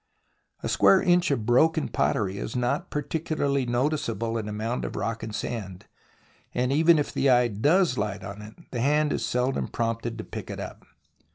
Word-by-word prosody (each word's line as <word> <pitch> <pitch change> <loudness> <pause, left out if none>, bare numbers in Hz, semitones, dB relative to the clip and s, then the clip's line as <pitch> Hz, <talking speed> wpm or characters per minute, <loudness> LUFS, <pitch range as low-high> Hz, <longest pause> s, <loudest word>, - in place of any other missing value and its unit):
A - - -1
square 195 - +5
inch 175 -1 +3
of 130 -7 0
broken 160 +7 +3
pottery 100 -2 0
is - - -5
not 125 0 -1
particularly 145 -3 -1
noticeable 120 -3 -1
in 110 -2 -3
a - - -4
mound 110 +4 -3
of - - -5
rock 115 -1 -2
and 110 - -5
sand, 100 -5 -5 0.7
and 125 +1 +1
even 160 +3 +5
if 145 - -1
the 140 - +2
eye 125 -1 +4
does 145 - +3
Hght 105 -1 -2
on 100 +1 -7
it 105 +1 -11 0.2
the 120 - -2
hand 150 +3 +2
is - - -2
seldom 125 +2 0
prompted 115 0 -2
to 110 - -5
pick - - -8
it - - -5
up. - - -8
120 Hz, 185 wpm, -26 LUFS, 110-145 Hz, 0.7 s, square